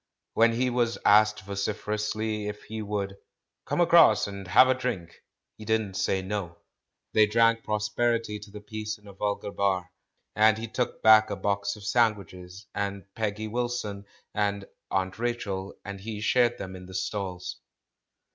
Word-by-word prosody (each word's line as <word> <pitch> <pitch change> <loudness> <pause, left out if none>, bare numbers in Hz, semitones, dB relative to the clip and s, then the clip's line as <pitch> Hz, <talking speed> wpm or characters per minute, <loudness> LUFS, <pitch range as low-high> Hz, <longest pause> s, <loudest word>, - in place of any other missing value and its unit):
When 115 0 +4
he 125 +2 +1
was 120 -1 +1
asked 105 0 +5
vociferously 105 +2 -2
if 105 0 -6
he 110 0 -6
would 100 -2 -3 0.5
"come - - -1
across 170 -10 +6
and 100 -2 -7
have 130 +8 +7
a 130 - +4
drink," 120 -10 -4 0.4
he - - -8
didn't 110 -2 0
say 95 0 0
"no." 95 -4 -4 0.6
They 110 -1 +5
drank 115 +1 +3
prosperity 105 +1 0
to 105 - -12
the 105 0 -10
piece 110 0 -5
in 105 - -24
a 100 - -11
vulgar 100 +1 -2
bar. 95 -3 0 0.4
And 110 0 +5
he 115 +1 -5
took 120 +2 -3
back 110 0 +7
a 100 - -2
box 100 +1 -1
of 105 - -12
sandwiches, 100 -4 -1
and 100 -1 -3
Peggy 110 -1 -2
Wil 120 +2 -1
son, 105 -4 -4 0.3
and 100 -1 -1 0.2
"Aunt 95 +2 -1
Rachel," 105 -5 -3
and 100 -1 -7
he 105 0 -5
shared 120 +1 +2
them 95 -1 -7
in 90 0 -10
the 95 - -10
stalls. 95 -1 -3
105 Hz, 165 wpm, -27 LUFS, 100-110 Hz, 0.6 s, have